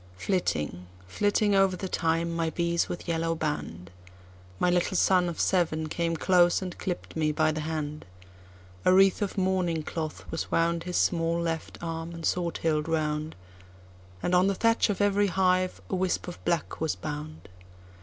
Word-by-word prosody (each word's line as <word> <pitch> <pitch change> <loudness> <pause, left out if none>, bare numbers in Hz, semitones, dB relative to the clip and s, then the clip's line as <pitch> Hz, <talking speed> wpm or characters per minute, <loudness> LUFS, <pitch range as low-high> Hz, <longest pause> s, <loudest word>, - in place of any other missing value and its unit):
Flitting, 90 - -1 0.2
flitting 205 - +1
over 195 -1 +3
the 190 - -4
thyme, 165 -1 0
my 165 -1 0
bees 170 +1 0
with 175 - -6
yellow 165 0 0
band—My 90 - -6
little 180 +1 +1
son 180 -1 +3
of 170 - -6
seven 160 -4 +1
came 165 0 -1
close, 175 0 +4
and 185 -2 -5
clipp'd 180 -2 -4
me 155 -1 +1
by 155 +1 +2
the 155 - -3
hand;A 95 - -5
wreath 195 +2 +5
of 205 -1 -2
mourning 185 -4 0
cloth 155 0 -5
was 165 - -2
woundHis 170 +1 0
small 165 -1 +1
left 165 -1 -3
arm 165 0 -4
and 165 -1 -6
sword 175 -2 0
hilt 155 -2 +1
round, 155 -1 -1 0.9
And 175 - 0
on 180 +1 +5
the 200 - +1
thatch 230 +2 +2
of 205 -1 -1
every 205 0 +3
hive 185 0 +1
a - - -6
wisp 185 -1 -1
of 175 - -8
black 170 -3 -1
was 160 -1 0
bound. 155 +1 -7
165 Hz, 160 wpm, -28 LUFS, 155-180 Hz, 0.9 s, wreath